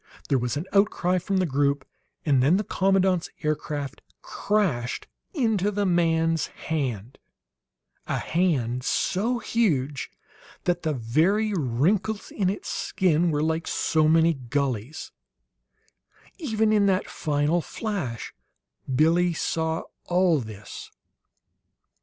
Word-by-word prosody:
There 135 - +3
was 125 +3 -2
an 155 - -3
outcry 185 -3 +2
from 190 +2 -1
the 185 - +2
group, 140 -2 +1 0.4
and 140 -4 +3
then 150 +8 +4
the 210 - -1
commandant's 190 -3 +1
aircraft 150 -2 -3 0.2
crashed 175 - -1 0.3
into 220 - +1
the 205 0 -1
man's 165 -2 +2
HAND; 125 -8 -4 0.9
a - - -1
hand 130 -9 0
so 225 - 0
huge 150 - 0 0.5
that 175 -1 0
the 155 -2 -1
very 165 - +1
wrinkles 185 - 0
in 190 -3 0
its 200 - -4
skin 175 -2 +1
were 150 -1 0
like 160 +1 -1
so 155 -1 +2
many 165 +1 +4
gulleys; 130 -1 -3 1.3
even 220 -8 +1
in 205 -2 +4
that 190 -1 +1
final 150 +3 0
flash 175 - -4 0.6
Billie 170 +6 +3
saw 160 0 -1 0.2
all 175 -3 +3
this. 110 -4 -9
165 Hz, 115 wpm, -25 LUFS, 140-190 Hz, 1.3 s, then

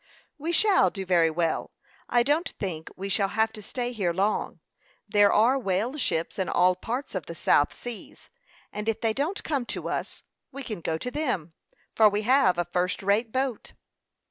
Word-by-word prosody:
"We 320 +4 -2
shall 400 +2 +4
do 195 -2 -6
very 170 -3 +4
well. 165 0 -1 0.4
I 240 -1 +4
don't 300 +7 +1
think 165 -5 -4
we 195 +1 -5
shall 195 0 +1
have 220 +2 0
to 215 - -8
stay 245 +3 -3
here 200 -7 -1
long. 195 +4 -1 0.5
There 205 -1 +4
are 245 +6 +4
whale 215 +4 -1
ships 170 - -1
in 190 - 0
all 180 +1 +4
parts 245 +9 -5
of 185 -6 -4
the 170 - -7
South 145 -2 +3
Seas, 240 -3 -9 0.4
and 210 +1 -2
if 225 - -1
they 225 -2 +1
don't 300 - -2
come 280 -5 -1
to - - -4
us, - - -4 0.3
we 275 +1 -7
can 215 -8 -6
go 160 0 -1
to 250 +9 -4
them, 245 - -2 0.4
for 220 -1 +6
we 205 +1 -2
have 225 -7 +4
a 175 - 0
first 180 +3 -1
rate 210 +4 +1
boat." 260 -2 -2
210 Hz, 190 wpm, -26 LUFS, 185-250 Hz, 0.5 s, for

